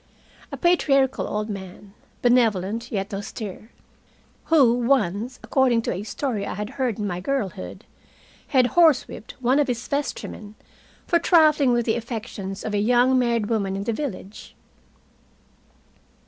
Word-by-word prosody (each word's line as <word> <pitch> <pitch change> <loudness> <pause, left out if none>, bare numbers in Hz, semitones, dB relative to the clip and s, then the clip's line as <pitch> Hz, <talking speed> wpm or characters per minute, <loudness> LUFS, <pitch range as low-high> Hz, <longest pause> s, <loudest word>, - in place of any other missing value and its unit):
A - - -5
patriarchal 275 -7 +2
old 210 0 -3
man, 195 -1 -9 0.3
benevolent 230 -2 +2
yet 200 -2 -3
austere, 205 +1 -7 0.8
who 280 -8 +5
once, 240 -2 0
according 250 -4 +2
to - - -2
a 185 - -4
story 220 0 -3
I 200 - -4
had 210 +2 -5
heard 250 -6 -2
in 210 - -3
my 180 -3 -3
girlhood, 190 - -4 0.6
had 255 -2 +3
horsewhipped 310 -9 +2
one 255 +4 +3
of 290 - +2
his 245 -1 -3
vestrymen 220 -7 -4 0.5
for 340 - +2
trifling 310 -6 +4
with 240 -1 +1
the 225 0 +1
affections 220 -4 -6
of 215 - -3
a 205 - +1
young 245 +4 +3
married 235 -3 +1
woman 205 -3 -1
in 195 - -3
the 230 - -1
village! 215 -6 -7
230 Hz, 140 wpm, -23 LUFS, 205-260 Hz, 0.8 s, who